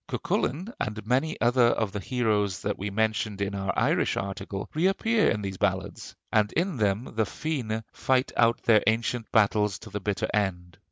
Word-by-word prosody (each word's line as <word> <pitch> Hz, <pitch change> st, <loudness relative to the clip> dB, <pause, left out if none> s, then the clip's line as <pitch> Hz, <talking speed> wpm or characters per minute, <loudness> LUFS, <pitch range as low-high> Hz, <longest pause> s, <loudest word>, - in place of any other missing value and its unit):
Cuculain 180 Hz, -, -2 dB
and 105 Hz, -1 st, -3 dB
many 130 Hz, +7 st, 0 dB
other 120 Hz, +1 st, +4 dB
of 110 Hz, -3 st, 0 dB
the 105 Hz, -, -4 dB
heroes 105 Hz, -5 st, 0 dB
that -, -, -1 dB
we 100 Hz, +2 st, -2 dB
mentioned 110 Hz, 0 st, -1 dB
in 100 Hz, 0 st, -2 dB
our 100 Hz, -1 st, -1 dB
Irish -, -, +2 dB
article 95 Hz, 0 st, -4 dB
reappear 195 Hz, +7 st, +2 dB
in 105 Hz, -2 st, -1 dB
these 95 Hz, -1 st, -4 dB
ballads; -, -, -2 dB, 0.2 s
and 105 Hz, -1 st, +2 dB
in 175 Hz, -2 st, 0 dB
them 105 Hz, 0 st, +1 dB
the 110 Hz, -, +2 dB
Féinne 115 Hz, -4 st, -3 dB
fight 130 Hz, 0 st, +1 dB
out 115 Hz, 0 st, +3 dB
their 110 Hz, -4 st, +5 dB
ancient 115 Hz, +1 st, 0 dB
battles 105 Hz, -2 st, +3 dB
to 110 Hz, 0 st, -12 dB
the 105 Hz, -, -3 dB
bitter 100 Hz, 0 st, -1 dB
end. 90 Hz, -4 st, -2 dB
110 Hz, 175 wpm, -27 LUFS, 100-125 Hz, 0.2 s, their